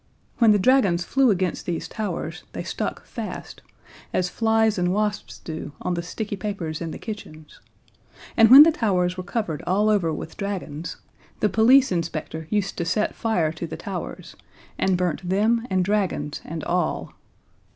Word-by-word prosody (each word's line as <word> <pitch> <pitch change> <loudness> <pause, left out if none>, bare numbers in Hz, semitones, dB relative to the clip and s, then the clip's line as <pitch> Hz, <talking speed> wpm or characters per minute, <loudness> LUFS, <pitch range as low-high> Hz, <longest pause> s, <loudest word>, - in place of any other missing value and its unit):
When 230 -2 +6
the 210 - +5
dragons 200 -6 +3
flew 270 +6 +3
against 185 -3 -1
these 170 -2 -2
towers, 175 -6 -4
they - - -4
stuck - - -4
fast, - - -7 0.5
as 180 -1 0
flies 220 -1 +2
and 180 0 +1
wasps 210 +1 -2
do 160 -2 -7
on 180 - -2
the 170 - -2
sticky 205 +4 -5
papers 185 -7 -4
in 165 - -3
the - - -6
kitchen; 155 -8 -8 0.9
and 225 -1 +6
when 270 +4 +12
the 330 - +5
towers 185 - 0
were 185 - -4
covered 180 -6 -3
all 210 +4 +3
over 185 -6 +2
with 155 +1 -6
dragons, 170 -6 -4 0.4
the 210 - +2
police 245 +6 +5
inspector 160 -2 -3
used 200 -3 -1
to - - +1
set 210 +6 0
fire 180 -9 0
to 165 +1 -6
the - - -7
towers, - - -6 0.4
and 190 -1 +1
burnt 180 0 -2
them 225 +5 +2
and 185 -1 +1
dragons 185 -8 -1
and 160 0 -5
all. 175 -2 -1
185 Hz, 165 wpm, -24 LUFS, 170-215 Hz, 0.9 s, when